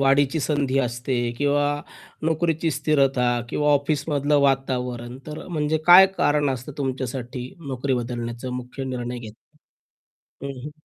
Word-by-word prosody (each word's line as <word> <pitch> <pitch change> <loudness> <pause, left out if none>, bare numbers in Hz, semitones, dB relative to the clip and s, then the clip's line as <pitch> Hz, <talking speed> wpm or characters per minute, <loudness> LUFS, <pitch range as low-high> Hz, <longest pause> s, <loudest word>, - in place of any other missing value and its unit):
वाढीची 140 +2 +3
संधी 140 -2 0
असते 125 0 -1 0.2
किंवा 145 0 +2 0.6
नोकरीची 160 0 0
स्थिरता 135 -4 +2 0.2
किंवा 150 0 +2
ऑफिसमधलं 145 0 +1
वातावरण. 125 -3 -1
तर 155 0 -7
म्हणजे 155 -2 0
काय 180 +2 +10
कारण 145 -1 +2
असतं 130 +2 -5
तुमच्यासाठी 130 -1 -4 0.2
नोकरी 130 0 -1
बदलण्याचा 120 0 -4
मुख्य 125 +2 -5
निर्णय 125 -1 -4
घेताना. 115 +5 -13 0.9
हं, 135 -2 -6
हं. 150 - -5
135 Hz, 120 wpm, -24 LUFS, 125-145 Hz, 0.9 s, काय